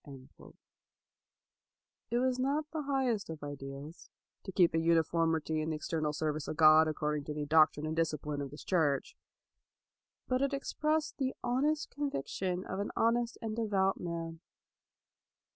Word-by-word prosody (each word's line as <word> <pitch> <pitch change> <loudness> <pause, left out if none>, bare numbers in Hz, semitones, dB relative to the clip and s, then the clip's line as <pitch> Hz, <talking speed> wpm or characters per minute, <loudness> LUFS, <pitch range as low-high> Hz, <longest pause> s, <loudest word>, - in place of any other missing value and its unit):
It 240 - +1
was 255 0 +1
not 280 +4 +1
the 315 - -2
highest 265 - 0
of 160 -2 -7
ideals, 140 +2 -8 0.2
" - - -59
to - - -6
keep 175 -3 +4
a 165 - +2
uniformity 165 -1 +2
in 155 - -2
the 160 - -1
ex 155 - -6
ternal 155 -2 0
service 155 0 -2
of 155 - -4
God 155 0 +7
according 150 -1 -2
to 150 - -5
the 150 -1 -2
doctrine 155 0 +4
and 155 +1 -2
discipline 150 -3 -1
of 140 - -4
this 145 - -10
church' 155 -7 +1 1.1
1; 255 0 +1
but - - +1
it 275 0 +1
expressed 305 +2 -1
the 265 -1 -1
honest 290 +6 0
conviction 185 - -3
of 190 - -4
an 200 - -2
honest 235 +1 +1
and 220 -1 -3
devout 200 -4 +1
man. 165 -1 -5
165 Hz, 160 wpm, -32 LUFS, 155-240 Hz, 1.1 s, God